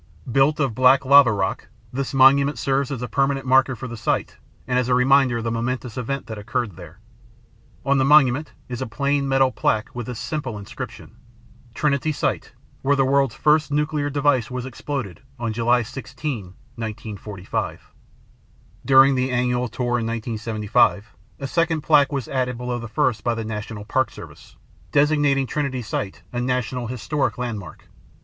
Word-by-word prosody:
Built 135 +5 +3
of 135 -5 +1
black 130 +3 +4
lava 140 -2 +7
rock, 100 0 -2 0.3
this 135 +1 -2
monument 140 +2 +5
serves 135 -1 0
as 130 -4 -4
a - - -2
permanent 135 +1 0
marker 130 0 +4
for 125 - -7
the 120 - -7
site 110 - -2 0.3
and 125 0 +1
as 125 0 -1
a 125 - +4
reminder 130 -1 +4
of 115 - -4
the 115 - -1
momentous 120 0 -3
event 135 +2 -3
that 110 -2 -7
occurred 105 -1 -3
there. 85 -2 -12 0.9
On 140 0 +3
the - - +3
monument 145 0 +4
is 125 0 -5
a 130 - -2
plain 140 +4 0
metal 135 -1 +3
plaque 110 -3 -1
with 120 -2 -6
this 125 -2 -5
simple 130 -5 -4
inscription: 115 +2 -9 0.6
"Trinity 150 +1 +1
Site 145 - -2 0.3
Where 140 +1 +2
the 135 -1 +2
World's 135 -3 +2
First 155 +3 +3
Nuclear 150 0 0
Device 140 -3 +1
Was 125 -1 -4
Exploded 130 -4 -5 0.2
on 115 -2 -3
July 120 +2 +2
16, 125 -1 -5 0.3
1945." 105 -3 -5 0.9
During 135 0 +6
the 130 0 0
annual 125 0 0
tour 120 +1 -1
in 115 - -2
1975, 110 -3 0 0.3
a 140 - -5
second 165 +2 0
plaque 145 -2 +4
was 135 -5 -3
added 125 -2 -1
below 125 0 -3
the 120 - -6
first 110 0 0
by 120 -1 0
The 115 -1 -4
National 105 -1 -6
Park 130 +4 +1
Service, - - -13 0.4
designating 145 -2 +3
Trinity 135 -3 -2
Site 100 -5 -4
a 120 - -1
National 125 -1 -2
Historic 130 +3 -2
Landmark. 120 -6 -6
125 Hz, 165 wpm, -22 LUFS, 115-140 Hz, 0.9 s, lava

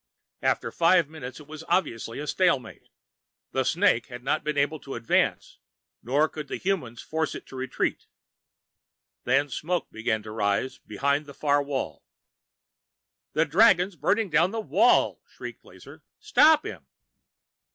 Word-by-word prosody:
After - - 0
five 170 -1 +4
minutes, 135 -5 -8
it 150 - -13
was 155 +1 -9
obviously 115 -10 -1
a 150 - -4
stalemate. 145 -7 0 0.6
The 130 - 0
snake 160 - +2
had 125 -1 -9
not 135 - 0
been 150 -1 -2
able 145 +2 +1
to 135 - -8
advance, 115 -1 0 0.4
nor 145 +6 +2
could 150 -2 -8
the - - -4
humans 155 -12 -2
force 160 -1 -2
it - - -8
to - - -12
retreat. 130 0 -2 1.2
Then 145 - +3
smoke 170 +6 -3
began 110 -1 -2
to 105 - -8
rise 105 +4 -1
behind 140 +7 -1
the 140 - -11
far 145 -1 +2
wall. 140 -2 -4 1.3
"The 155 +2 +3
dragon's 185 +2 +4
burning 205 +1 0
down 165 +4 +4
the 225 +3 -4
wall!" 220 - +3
shrieked - - -9
Lazar. - - -15 0.2
"Stop 305 +4 +4
him!" - - -8
145 Hz, 145 wpm, -26 LUFS, 130-170 Hz, 1.3 s, five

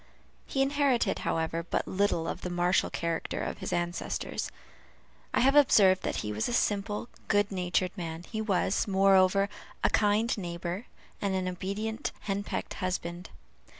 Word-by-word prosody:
He 270 - +1
inherited, 270 -6 +2
however, 165 0 -1
but 170 - -2
little 190 -4 +1
of - - -4
the 180 - -3
martial 175 +1 +2
character 170 -1 -2
of - - -4
his - - -4
ancestors. 175 0 -2 0.8
I - - +2
have 270 +3 +4
observed 200 -10 +6
that - - -2
he 105 - -2
was 105 - -1
a - - -2
simple, 210 -1 0 0.2
good 205 -1 +2
natured 185 0 0
man; 165 -3 -5
he 220 -1 -3
was, 195 -2 +1
moreover, 195 0 +4 0.4
a - - +3
kind 210 +2 +2
neighbor, 175 +3 -4 0.3
and 195 -1 0
an 185 -1 -1
obedient 210 +7 -3
henpecked 200 0 -3
husband. 180 -1 -3
190 Hz, 150 wpm, -29 LUFS, 175-210 Hz, 0.8 s, observed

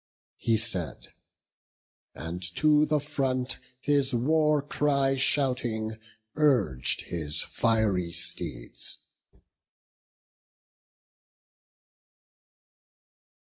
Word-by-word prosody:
He 115 -1 +2
said, 90 - -2 1.1
and 85 +3 -6
to 150 0 +4
the 150 0 +2
front, 135 -3 -2 0.2
His 140 -2 +1
war 150 +3 +2
cry 140 -2 +1
shouting, 125 -5 +1 0.4
urg'd 120 - +2
his 75 -3 0
fiery 105 -7 0
steeds. 85 0 -2
130 Hz, 60 wpm, -27 LUFS, 100-145 Hz, 1.1 s, to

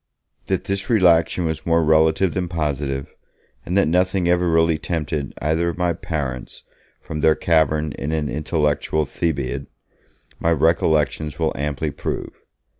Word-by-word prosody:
That - - 0
this 100 +3 -3
relaxation 90 -5 +3
was 80 -1 -3
more 85 0 +2
relative 80 +3 +3
than 90 -2 -2
positive, 70 -5 -3 0.5
and 90 +3 -1
that 100 - +4
nothing 90 +2 +1
ever 90 0 +2
really 80 -1 +3
tempted 75 -4 -3
either 80 +3 0
of 85 - -5
my 90 -1 +1
parents 70 -7 -5 0.4
from 75 - -6
their 80 0 +4
cavern 80 -2 +1
in 70 +2 -4
an 80 -2 -1
intellectual 75 +1 0
Thebaid, 70 -4 -2 0.7
my 85 - +1
recollections 80 -1 +1
will - - 0
amply 75 +2 -2
prove. - - -4
80 Hz, 140 wpm, -21 LUFS, 75-85 Hz, 0.7 s, that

